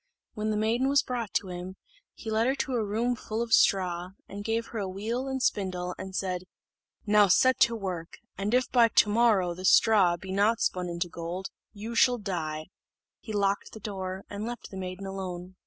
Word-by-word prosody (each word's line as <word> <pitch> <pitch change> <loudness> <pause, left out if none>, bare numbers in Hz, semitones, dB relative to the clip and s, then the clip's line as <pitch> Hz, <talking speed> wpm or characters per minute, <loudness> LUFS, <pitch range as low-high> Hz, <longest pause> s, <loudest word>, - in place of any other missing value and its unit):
When 215 -1 -2
the 215 - 0
maiden 230 +5 +1
was 280 0 +4
brought 240 -6 -3
to 190 - 0
him, 180 +1 -6 0.4
he 220 - -6
led 220 +2 +2
her 265 - +2
to 270 -1 -2
a 235 -3 +1
room 225 +4 0
full 220 -1 -5
of 230 -1 -3
straw, 180 -1 +3 0.3
gave 225 +2 -1
her 225 - -4
a 195 - -2
wheel 225 +7 -3
and 265 -1 -2
spindle, 180 -3 -1
and 190 0 -7
said, 185 -2 -2 0.6
"Now 210 -1 +5
set 255 +7 +4
to 235 - +4
work, 185 -6 -5 0.2
and 200 +2 -2
if 255 0 +2
by 240 -2 +6
the 210 - +4
morrow 210 -6 +3
this 185 +2 +1
straw 195 -6 +5
be 190 +2 -8
not 210 +4 +2
spun 180 -1 -1
into 170 +1 -2
gold, 170 +3 -6 0.2
you 215 +2 -7
shall 245 +1 +4
die." 160 -7 -4 0.5
He 220 - -8
locked 200 -1 0
the 220 - -8
door, 190 -2 -5
and 205 +1 -6
left 240 +2 -6
the - - -8
maiden 185 +1 -5
alone. 185 -1 -6
200 Hz, 200 wpm, -28 LUFS, 185-225 Hz, 0.6 s, by